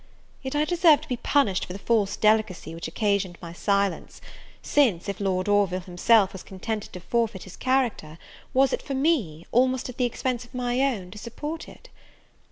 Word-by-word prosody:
Yet 265 Hz, +1 st, -5 dB
I 300 Hz, +1 st, +2 dB
deserve 335 Hz, -3 st, +5 dB
to -, -, -11 dB
be 250 Hz, -4 st, -2 dB
punished 230 Hz, -9 st, +1 dB
for 180 Hz, -, -6 dB
the -, -, -6 dB
false 205 Hz, -1 st, +1 dB
delicacy 215 Hz, -6 st, +1 dB
which 165 Hz, 0 st, -5 dB
occasioned 200 Hz, 0 st, 0 dB
my 170 Hz, -1 st, -8 dB
silence, 200 Hz, +1 st, -1 dB, 0.4 s
since, 225 Hz, -12 st, +2 dB
if 200 Hz, -1 st, -4 dB
Lord 185 Hz, -2 st, 0 dB
Orville 200 Hz, -3 st, +2 dB
himself 190 Hz, +3 st, +3 dB
was 190 Hz, -, -8 dB
contented 210 Hz, +3 st, -5 dB
to 180 Hz, -, -6 dB
forfeit 225 Hz, 0 st, -1 dB
his 190 Hz, -, -11 dB
character, 245 Hz, -12 st, 0 dB, 0.3 s
was 265 Hz, 0 st, +3 dB
it -, -, -1 dB
for 275 Hz, -, -4 dB
me, 255 Hz, -, 0 dB
almost 255 Hz, +1 st, +2 dB
at 250 Hz, -, -9 dB
the 250 Hz, -, +2 dB
expense 245 Hz, 0 st, -2 dB
of 245 Hz, +1 st, -15 dB
my 245 Hz, 0 st, -1 dB
own, 220 Hz, -10 st, -1 dB
to 210 Hz, -, -9 dB
support 295 Hz, +8 st, -6 dB
it? -, -, -16 dB
215 Hz, 185 wpm, -25 LUFS, 185-255 Hz, 0.4 s, deserve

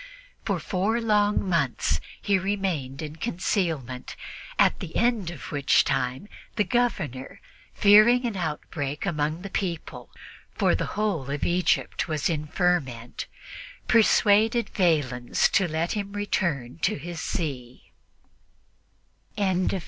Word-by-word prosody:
For -, -, 0 dB
four 205 Hz, +5 st, 0 dB
long 210 Hz, -3 st, +2 dB
months 170 Hz, -2 st, +1 dB, 0.2 s
he 200 Hz, -2 st, +1 dB
remained 180 Hz, -8 st, -2 dB
in 155 Hz, +1 st, -7 dB
concealment: 165 Hz, -, -2 dB, 0.4 s
at -, -, +4 dB
the 165 Hz, -, -7 dB
end 230 Hz, -7 st, +1 dB
of 170 Hz, -5 st, -8 dB
which 140 Hz, -2 st, +3 dB
time 135 Hz, +5 st, -1 dB, 0.3 s
the 210 Hz, -, +3 dB
Governor, 190 Hz, -, -1 dB, 0.4 s
fearing 215 Hz, +4 st, +6 dB
an 230 Hz, -4 st, -2 dB
outbreak 150 Hz, -3 st, -3 dB
among 155 Hz, -1 st, -1 dB
the 200 Hz, -, -6 dB
people 175 Hz, -6 st, -4 dB, 0.5 s
for -, -, +2 dB
the -, -, -1 dB
whole 195 Hz, -11 st, -1 dB
of 145 Hz, +1 st, -3 dB
Egypt 175 Hz, +1 st, +1 dB
was 155 Hz, 0 st, 0 dB
in 150 Hz, -2 st, -2 dB
a -, -, -12 dB
ferment 140 Hz, -10 st, -1 dB, 0.6 s
persuaded 220 Hz, 0 st, +4 dB
Valens 145 Hz, -, +2 dB
to 190 Hz, -, +2 dB
let 160 Hz, +1 st, -1 dB
him 200 Hz, -1 st, -3 dB
return 190 Hz, -9 st, -1 dB
in 125 Hz, +6 st, -13 dB
peace -, -, +2 dB
to 215 Hz, -, -1 dB
his 170 Hz, +3 st, -7 dB
see. 130 Hz, -6 st, -5 dB
175 Hz, 125 wpm, -26 LUFS, 145-205 Hz, 0.6 s, fearing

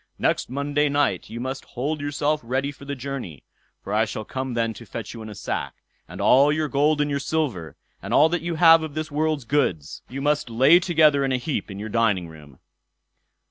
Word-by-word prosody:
Next -, -, 0 dB
Monday 145 Hz, +2 st, 0 dB
night 145 Hz, 0 st, 0 dB
you 115 Hz, -, -6 dB
must 130 Hz, +2 st, -4 dB
hold 145 Hz, +4 st, -4 dB
yourself 145 Hz, +1 st, -1 dB
ready 130 Hz, +4 st, -1 dB
for 140 Hz, -1 st, -14 dB
the 140 Hz, 0 st, -4 dB
journey, 130 Hz, -, -6 dB, 0.4 s
for 100 Hz, -, -5 dB
I 110 Hz, +1 st, +3 dB
shall 110 Hz, 0 st, -6 dB
come 130 Hz, 0 st, -4 dB
then 115 Hz, -1 st, 0 dB
to 115 Hz, -, -12 dB
fetch 110 Hz, +2 st, -6 dB
you 115 Hz, -, -9 dB
in 110 Hz, -, -8 dB
a 105 Hz, -, -9 dB
sack; 95 Hz, -, -4 dB, 0.3 s
and -, -, -10 dB
all 140 Hz, +3 st, +5 dB
your 155 Hz, 0 st, 0 dB
gold 150 Hz, +1 st, +2 dB
and 145 Hz, 0 st, 0 dB
your 140 Hz, -, 0 dB
silver, 130 Hz, -, -2 dB, 0.3 s
and -, -, -7 dB
all 150 Hz, -, +6 dB
that 175 Hz, +1 st, -1 dB
you 170 Hz, 0 st, -3 dB
have 165 Hz, 0 st, +7 dB
of 155 Hz, -2 st, -6 dB
this 155 Hz, 0 st, -4 dB
world's 150 Hz, -2 st, -1 dB
goods, 100 Hz, -, -1 dB
you 135 Hz, -, -6 dB
must 145 Hz, -2 st, 0 dB
lay 135 Hz, +9 st, +6 dB
together 155 Hz, -5 st, +3 dB
in 135 Hz, -, 0 dB
a 130 Hz, -, +2 dB
heap 130 Hz, 0 st, -3 dB
in 95 Hz, -, -7 dB
your 105 Hz, +2 st, -6 dB
dining 105 Hz, -6 st, +1 dB
room." 75 Hz, -4 st, -14 dB
140 Hz, 220 wpm, -24 LUFS, 115-150 Hz, 0.4 s, have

